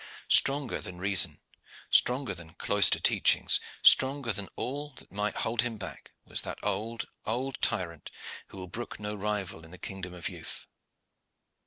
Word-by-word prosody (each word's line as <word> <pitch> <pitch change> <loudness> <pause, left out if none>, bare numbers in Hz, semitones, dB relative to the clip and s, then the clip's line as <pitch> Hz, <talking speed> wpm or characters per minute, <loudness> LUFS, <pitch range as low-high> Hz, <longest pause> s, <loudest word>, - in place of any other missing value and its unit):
Stronger 140 -2 +4
than 90 - -7
reason, 95 +1 +4 0.5
stronger 125 -3 +3
than 85 -2 -9
cloister - - +4
teachings, - - +4 0.2
stronger 135 -3 +5
than 100 -1 -3
all 145 +3 -4
that - - -13
might 105 +1 -1
hold 115 0 0
him 120 -2 -3
back, 95 -3 -8 0.2
was - - -1
that - - -6
old, 115 +1 -2 0.2
old 130 +4 -2
tyrant 85 -5 -1 0.4
who - - -13
will 95 -1 -7
brook 120 +5 -7
no 105 0 -4
rival 105 -5 -3
in 80 - -13
the 90 - -11
kingdom 95 -1 -6
of 85 - -3
youth. - - -6
105 Hz, 155 wpm, -29 LUFS, 95-120 Hz, 0.5 s, stronger